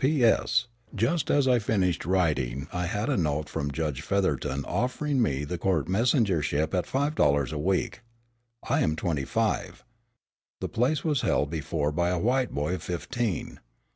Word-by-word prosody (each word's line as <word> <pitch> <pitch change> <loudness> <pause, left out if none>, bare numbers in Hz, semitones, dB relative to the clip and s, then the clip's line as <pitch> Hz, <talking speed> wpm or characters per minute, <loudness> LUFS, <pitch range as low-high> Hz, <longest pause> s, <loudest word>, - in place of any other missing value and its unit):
"P.S. 125 -4 +3 0.3
Just 130 - 0
as 145 -2 +3
I 125 -2 +4
finished 95 -7 0
writing 70 -8 0
I 90 0 -1
had 105 +3 -2
a 145 - +1
note 75 -4 0
from 70 0 -3
Judge 75 -1 -2
Featherton 70 -7 -1
offering 130 +2 0
me 70 - 0
the 85 +4 -4
court 90 -6 +1
messengership 95 - +1
at 90 -1 0
five 145 +3 0
dollars 70 - +2
a 75 - -3
week. 95 +7 -1 0.7
I - - +2
am 80 - +1
twenty 80 -4 -1
five. 100 +1 -1 0.8
The - - -3
place 135 +6 +1
was 150 -5 +1
held 70 +1 +1
before 75 -1 -1
by 85 +3 +1
a 90 - 0
white 125 +7 +1
boy 75 +5 -2
of 95 - -3
fifteen. 105 +3 -3
90 Hz, 165 wpm, -27 LUFS, 75-120 Hz, 0.8 s, I